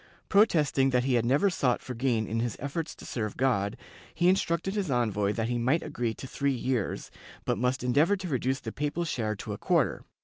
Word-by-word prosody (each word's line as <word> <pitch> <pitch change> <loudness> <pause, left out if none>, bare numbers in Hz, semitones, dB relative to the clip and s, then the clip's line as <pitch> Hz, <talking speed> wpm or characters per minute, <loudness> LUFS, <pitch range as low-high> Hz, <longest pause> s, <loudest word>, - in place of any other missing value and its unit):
Protesting 155 -10 +4
that 125 -1 +2
he 130 0 +1
had 120 -1 +2
never 145 +11 +3
sought 125 -8 +1
for 130 - -7
gain 120 -2 0
in 110 +3 -2
his 115 -2 -2
efforts 150 +4 -4
to - - -12
serve 105 -4 -3
God, 115 -6 +1 0.4
he 175 +2 +4
instructed 185 0 +1
his 200 -5 -1
envoy 105 -6 +1
that 115 0 -1
he 120 0 -1
might 130 +8 +2
agree 115 -2 -2
to - - -8
three 140 +1 -1
years, 125 -3 -2 0.3
but - - 0
must 125 +1 0
endeavor 145 +11 +3
to 185 -1 -5
reduce 130 -2 -1
the - - -5
papal 150 +4 -2
share 110 -8 -1
to - - -6
a - - -7
quarter. - - +1
130 Hz, 210 wpm, -28 LUFS, 120-155 Hz, 0.4 s, Protesting